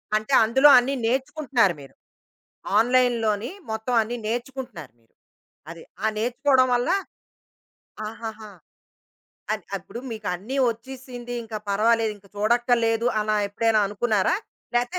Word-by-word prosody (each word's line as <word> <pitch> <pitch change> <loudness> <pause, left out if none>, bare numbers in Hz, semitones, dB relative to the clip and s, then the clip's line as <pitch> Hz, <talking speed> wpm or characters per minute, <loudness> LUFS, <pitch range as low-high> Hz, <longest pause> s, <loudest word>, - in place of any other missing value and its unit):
అంటే, 215 +5 -1
అందులో 265 +6 +5
అన్నీ 250 +3 +2
నేర్చుకుంటున్నారు 255 - +1
మీరు. 135 - -14 0.9
ఆన్‌లైన్ 245 +1 +3
లోని 215 +3 0 0.2
మొత్తం 220 +3 -2
అన్నీ 235 +3 -4
నేర్చుకుంటున్నారు 240 - -5
మీరు. 115 - -35 0.6
అది. 165 -1 -10 0.2
ఆ - - +4
నేర్చుకోవడం 255 +3 +2
వల్ల 245 0 0 1.2
ఆహాహా! 220 -1 -8 1.0
అది. - - -4
అప్పుడు 235 - -9
మీకన్నీ 215 +3 -4
వచ్చీసింది 245 0 -8
ఇంక 225 -1 -10 0.2
పర్వాలేదు, 220 +1 +2
ఇంక 200 - -22
చూడక్కర్లేదు, 235 +1 +2
అలా 215 0 0
ఎప్పుడైనా 220 +1 +2
అనుకున్నారా? 210 - +1 0.4
లేతే 245 +10 0
230 Hz, 110 wpm, -24 LUFS, 215-250 Hz, 1.2 s, అందులో